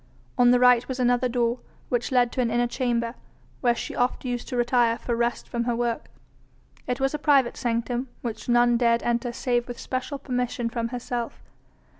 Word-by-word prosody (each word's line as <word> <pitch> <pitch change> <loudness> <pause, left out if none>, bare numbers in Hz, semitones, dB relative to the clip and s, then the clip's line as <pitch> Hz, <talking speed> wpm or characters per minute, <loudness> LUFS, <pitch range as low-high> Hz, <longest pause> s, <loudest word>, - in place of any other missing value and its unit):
On 245 -1 +5
the 245 0 +5
right 250 -1 +5
was 260 -1 -4
another 245 0 +2
door, 240 0 0 0.3
which 245 +1 -1
led 245 -2 +3
to 255 - -1
an 240 - +1
inner 240 +1 +2
chamber, 235 -2 -1 0.5
where 240 -2 +2
she - - -5
oft 250 +2 0
used 245 -1 -3
to 250 - -3
retire 240 -1 +3
for 240 -1 -2
rest 235 +1 -1
from 235 -1 -2
her 240 -1 0
work. 235 -1 -2 0.8
It 250 +1 -1
was 270 +1 +1
a 300 - -2
private 280 -5 +3
sanctum 240 +2 -1 0.2
which 225 -1 -5
none 240 0 +4
dared 235 -1 +2
enter 240 0 0
save 240 -1 -1
with 245 -1 -6
special 270 +2 -3
permission 250 -3 -2
from 230 0 -2
herself. 240 -1 -5
240 Hz, 190 wpm, -25 LUFS, 235-250 Hz, 0.8 s, On